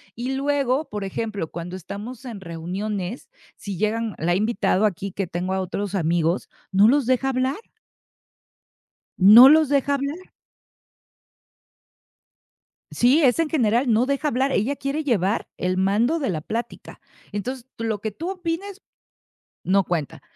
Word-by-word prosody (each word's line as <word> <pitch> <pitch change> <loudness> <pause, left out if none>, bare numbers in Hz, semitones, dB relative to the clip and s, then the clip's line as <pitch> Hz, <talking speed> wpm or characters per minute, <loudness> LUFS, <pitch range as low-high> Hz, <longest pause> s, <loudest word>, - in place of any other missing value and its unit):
Y 255 +3 -3
luego, 280 0 0
por 210 -1 -5
ejemplo, 200 -3 -4
cuando 175 +2 -7
estamos 210 +8 -8
en 220 -6 -7
reuniones, 185 - -5 0.3
si 200 -3 -7
llegan 220 +1 -1
la 175 +2 +1
he - - +2
invitado 215 -1 +1
aquí 195 -1 -2
que 195 0 -3
tengo 180 +3 -3
a 190 - 0
otros 200 +2 -4
amigos, 170 0 0 0.2
no 200 +3 +5
los 275 0 +3
deja 260 +1 +1
hablar. 260 +2 0 1.6
No 225 +8 +10
los 310 -2 +5
deja 280 0 +2
hablar. 280 +4 -3 2.7
Sí, 260 +7 +3
es 260 +2 +3
en 320 -2 +1
general 240 -3 +2
no 230 +3 +3
deja 280 +2 0
hablar, 265 +2 0
ella 255 +8 0
quiere 280 +3 -3
llevar 215 -6 0
el 185 0 -1
mando 220 - +2
de 270 - -1
la 165 - -2
plática. 230 +8 -6 0.3
Entonces 245 +5 -5
lo 225 -2 -2
que 220 +1 -4
tú 330 - -6
opines, 370 +2 -4 0.8
no 195 +1 +3
cuenta. 160 -6 -3
225 Hz, 145 wpm, -23 LUFS, 195-270 Hz, 2.7 s, No